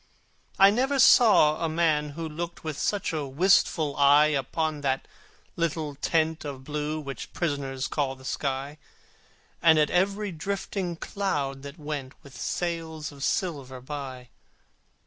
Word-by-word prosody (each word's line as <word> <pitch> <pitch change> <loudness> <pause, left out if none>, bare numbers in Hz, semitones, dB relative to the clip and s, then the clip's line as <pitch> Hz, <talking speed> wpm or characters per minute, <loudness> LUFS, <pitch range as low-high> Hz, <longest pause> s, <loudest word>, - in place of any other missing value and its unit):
I 195 +1 +7
never 265 +6 +1
saw 200 - +6
a 165 - +1
man 155 -2 +1
who 165 -1 -3
looked 170 +2 -6
With 155 -2 -4
such 200 +3 -1
a 150 -3 -2
wistful 155 -1 +2
eye 145 +2 +6
Upon 150 +2 -1
that 135 -1 -1 0.5
little 160 -3 -2
tent 160 +2 0
of 140 -3 -7
blue 150 +2 -3
Which 140 -3 -7
prisoners 140 -4 -2
call 140 -3 -1
the 130 0 -15
sky, 140 +2 -3 0.8
And 160 -1 +6
at 150 -1 +3
every 200 +3 +1
drifting 185 +1 -3
cloud 145 -8 -2
that 140 +3 -9
went 145 -4 -5
With 140 -2 -14
sails 165 -3 -3
of 140 -1 -9
silver 140 -9 -2
by. 130 -2 -7
150 Hz, 140 wpm, -27 LUFS, 140-170 Hz, 0.8 s, I